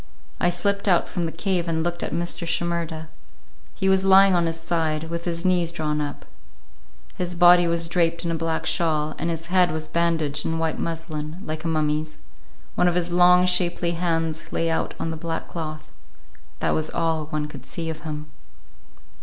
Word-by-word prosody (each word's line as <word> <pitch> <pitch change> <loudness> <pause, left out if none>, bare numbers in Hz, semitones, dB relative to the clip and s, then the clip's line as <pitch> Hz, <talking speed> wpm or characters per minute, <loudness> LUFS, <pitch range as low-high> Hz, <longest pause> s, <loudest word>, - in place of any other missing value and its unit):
I 175 - +3
slipped 200 +3 -1
out 175 -3 +3
from 175 - -2
the - - -4
cave 175 0 -1
and 160 -1 0
looked 175 0 -2
at - - -3
Mr. 170 +1 -2
Shimerda. 165 -1 -2 0.7
He 190 - -1
was 190 0 +4
lying 195 0 +7
on 170 -1 +2
his 165 0 -3
side, 165 -2 -1
with 170 0 -4
his 170 0 -3
knees 175 -2 +2
drawn 150 -3 -1
up. 145 -1 -5 0.9
His 180 0 -2
body 175 0 +7
was 170 0 0
draped 170 0 0
in 170 - 0
a - - -1
black 165 0 -2
shawl, 155 -2 +1
and 170 - -1
his 165 +1 -4
head 180 -1 +5
was 155 -1 -3
bandaged 165 -4 0
in 165 - -1
white 160 -1 -1
muslin, 160 -1 -4
like 155 0 -4
a - - -2
mummy's; 155 -1 -1 0.6
one 180 - +2
of 175 - +1
his 175 -1 0
long, 180 +1 +6
shapely 180 -1 +2
hands 165 -2 -2
lay 165 0 0
out 160 - -1
on 165 - -2
the 160 - -5
black 165 0 -4
cloth; 155 -2 -6 0.7
that - - +1
was 155 0 0
all 165 -2 -1
one 150 -1 -2
could 150 - -11
see 165 -1 -4
of 160 - -8
him. 150 -2 -5
165 Hz, 190 wpm, -24 LUFS, 160-175 Hz, 0.9 s, lying